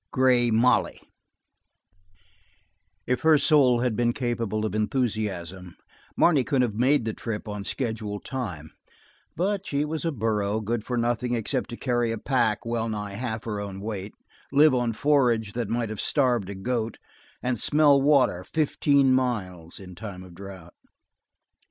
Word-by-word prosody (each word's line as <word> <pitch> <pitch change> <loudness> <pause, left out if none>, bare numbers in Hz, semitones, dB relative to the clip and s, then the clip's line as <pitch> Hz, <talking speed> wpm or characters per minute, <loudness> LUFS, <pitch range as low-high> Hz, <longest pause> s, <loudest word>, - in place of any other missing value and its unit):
Grey 125 -2 +3
Molly 115 +3 +2 2.1
If 125 0 -1
her 160 -1 +5
soul 140 -6 +4
had 125 -3 0
been 120 0 +1
capable 115 -4 -2
of 110 - -3
enthusiasm, 105 - -2 0.4
Marne 150 -7 +4
could 130 0 +1
have 115 -4 -1
made 125 +3 +2
the 110 - -2
trip 110 0 -5
on 105 -1 -5
schedule 110 -3 -3
time, 95 - -6 0.6
but 195 +3 -1
she 145 +1 0
was 155 +1 -3
a 165 - 0
burro 110 -4 -1
good 110 +1 -2
for 125 +1 -3
nothing 120 +1 0
except 120 +3 -2
to 120 - -7
carry 120 -3 0
a 115 - -3
pack 115 -3 0
well 115 -1 -1
nigh 105 -2 -4
half 110 0 -4
her 105 -3 -4
own 100 -1 -6
weight, 100 -1 -6 0.4
live 145 +1 +5
on 120 -2 +1
forage 120 -6 +2
that 120 -3 -3
might 115 -1 -1
have 110 -2 -4
starved 125 -9 +1
a 100 - -5
goat, 115 +2 -2 0.5
and 125 -2 -1
smell 145 +1 +4
water 135 -11 +3
fifteen 140 - +2
miles 95 -10 -2
in 90 -2 -11
time 95 -1 -8
of 90 -1 -13
drought. 95 -2 -11
115 Hz, 155 wpm, -25 LUFS, 105-130 Hz, 2.1 s, her